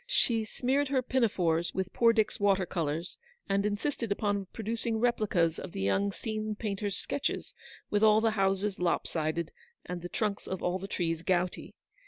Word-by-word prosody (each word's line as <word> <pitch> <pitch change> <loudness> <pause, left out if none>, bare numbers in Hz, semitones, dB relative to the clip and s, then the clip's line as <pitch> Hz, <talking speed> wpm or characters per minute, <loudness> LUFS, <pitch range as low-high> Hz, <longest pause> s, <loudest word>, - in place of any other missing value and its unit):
She 230 - +3
smeared 265 +6 0
her 265 -1 +1
pinafores 180 -10 +1
with 190 -1 -2
poor 230 -1 +5
Dick's 220 -2 +1
water 195 -2 +3
colours, 165 0 -3 0.3
and 200 +1 +2
insisted 225 +2 -2
upon 200 -2 0
producing 225 +2 -2
replicas 210 -9 +2
of 185 - -7
the - - -4
young 195 - +2
scene 215 0 -3
painter's 205 -2 -2
sketches, 285 - -2 0.4
with 205 - +2
all 215 0 +6
the 225 0 +2
houses 195 -1 +1
lop 175 -1 +1
sided, 160 0 -2 0.3
and 180 -1 -5
the 175 - -6
trunks 210 0 -2
of 190 - -4
all 180 +1 0
the 195 - -6
trees 165 -4 -1
gouty. 180 +1 -1
200 Hz, 170 wpm, -30 LUFS, 180-220 Hz, 0.4 s, all